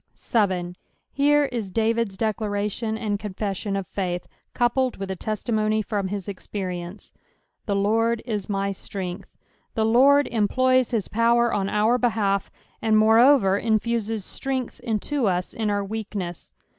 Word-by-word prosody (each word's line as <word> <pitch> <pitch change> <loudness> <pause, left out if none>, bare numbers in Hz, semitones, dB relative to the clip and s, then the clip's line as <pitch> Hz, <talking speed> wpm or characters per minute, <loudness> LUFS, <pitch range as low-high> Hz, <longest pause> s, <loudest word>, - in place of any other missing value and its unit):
1. 185 -5 +1 0.4
Here 290 +1 +4
is 225 -6 -4
DsTid'e 225 -1 0
declaration 215 0 -1
«nd 210 -2 -2
confewion 200 -1 -3
of 195 - -3
faith, 180 -2 -3 0.3
M>upled 250 +1 +1
with 195 -1 -4
a - - -2
testi' 215 +4 -3
monf 215 0 +1
from 205 -3 -1
hie 205 +2 -3
experience. 185 -1 -6 0.6
"7'Ae 200 -1 +1
Lurd 225 +2 +1
u 235 - -3
tny 200 -1 -1
ftrtngth.'^ 185 -2 -6 0.5
The 220 - +2
Ijord 275 +5 +5
employs 255 +3 +2
his 225 -5 -1
power 235 +1 +2
on 195 -1 0
our 220 +4 +2
behalf, 210 -5 +1 0.3
and 220 -1 +2
moreoTer, 220 -2 +5
infuses 225 -2 0
strength 260 -2 -4
into 240 +2 -1
us 180 -1 -1
in 220 -2 -1
our 205 -1 0
weakness. 200 -4 -5
215 Hz, 140 wpm, -24 LUFS, 195-235 Hz, 0.6 s, Ijord